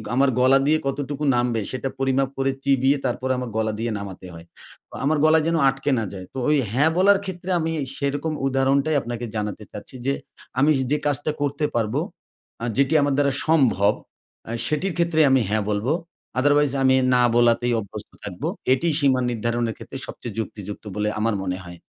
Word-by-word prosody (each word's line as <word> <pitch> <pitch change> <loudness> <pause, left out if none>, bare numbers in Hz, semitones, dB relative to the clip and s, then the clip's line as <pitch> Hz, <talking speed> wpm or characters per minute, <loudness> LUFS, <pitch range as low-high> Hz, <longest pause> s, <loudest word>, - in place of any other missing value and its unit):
আমার 135 +1 +4
গলা 130 +2 +6
দিয়ে 155 +1 +4
কতটুকু 145 +1 -3
নামবে, 120 -2 +1
সেটা 130 +1 -3
পরিমাপ 135 0 +1
করে 135 0 +1
চিবিয়ে 135 +1 +3
তারপরে 130 +1 -1
আমার 125 -2 -4
গলা 110 -1 0
দিয়ে 115 +1 -1
নামাতে 95 -2 -8
হয়। 85 0 -11 0.4
তো - - -21
আমার 150 +3 +2
গলায় 155 0 +5
যেন 165 - +2
আটকে 135 +2 -2
না 110 - -2
যায়। 95 -1 -7
তো - - -8
ঐ - - +3 0.2
হ্যাঁ 145 +5 +4
বলার 200 +2 +5
ক্ষেত্রে 185 -1 -6
আমি 165 0 -1 0.3
সেরকম 145 +3 -1
উদাহরণটাই 135 +3 +2
আপনাকে 120 0 -5
জানাতে 105 0 -3
চাচ্ছি 105 +5 -7
যে, 135 - +2 0.5
আমি 150 +3 +5 0.2
যে 150 - +3
কাজটা 145 +1 0
করতে 145 +1 0
পারবো, 110 -2 0 0.6
আ - - 0
যেটি 140 +2 +3
আমার 145 0 +1
দ্বারা 140 -1 +3 0.2
সম্ভব, 120 -10 +4 0.6
আ - - -4 0.2
সেটির 170 +5 -1
ক্ষেত্রে 170 -2 +1
আমি 130 -1 +4
হ্যাঁ 110 -1 +1
বলবো। 105 +8 0 0.5
Otherwise 145 0 +3
আমি 130 0 +5 0.2
না 125 - +4
বলাতেই 120 0 +3
অভ্যস্ত 100 -3 -8
থাকবো। - - -4 0.3
এটিই 165 +4 +1
সীমা 135 -3 +3
নির্ধারণের 115 0 -1
ক্ষেত্রে 135 - -8
সবচেয়ে 115 -2 -8
যুক্তিযুক্ত 105 -2 -6
বলে 105 0 0
আমার 110 -1 +1
মনে 90 -1 -2
হয়। 90 -1 -10
135 Hz, 180 wpm, -23 LUFS, 115-145 Hz, 0.6 s, গলা